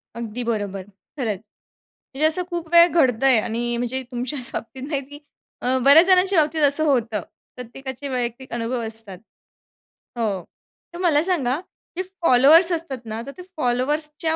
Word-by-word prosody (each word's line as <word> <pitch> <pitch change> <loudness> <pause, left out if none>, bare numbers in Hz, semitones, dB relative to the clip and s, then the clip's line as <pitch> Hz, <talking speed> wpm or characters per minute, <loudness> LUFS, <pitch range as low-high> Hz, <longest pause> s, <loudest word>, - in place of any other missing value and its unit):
अगदी 235 +1 -5
बरोबर, 205 -4 -3 0.4
खरंच. 220 -8 -2 0.7
म्हणजे 285 +4 +1
असं 360 +3 +3
खूप 345 -2 -5
वेळ 340 0 +8
घडतंय 265 -6 +3
आणि 235 +2 -3
म्हणजे 245 +2 -2
तुमच्याच 250 +1 -2
बाबतीत 255 +3 -7
नाही, 285 -3 -2
की 290 +2 -13 0.4
अ, 255 +1 +1
बऱ्याच 285 +6 +7
जणांच्या 370 -1 +4
बाबतीत 310 +1 -2
असं 285 +2 +5
होतं. 230 -8 0 0.3
प्रत्येकाचे 260 +2 -8
वैयक्तिक 250 +1 -4
अनुभव 240 +1 -3
असतात. 220 -4 -4 1.0
हो, 210 -5 -1 0.5
तर - - -8
मला 320 -5 +3
सांगा, 300 -7 0 0.4
जे 370 - -1 0.2
फॉलोवर्स 320 +5 +6
असतात 300 -8 -2
ना, 220 +1 -5
तर 275 - -6
ते - - -9 0.2
फॉलोवर्सच्या 300 +5 -1
260 Hz, 145 wpm, -22 LUFS, 235-310 Hz, 1.0 s, वेळ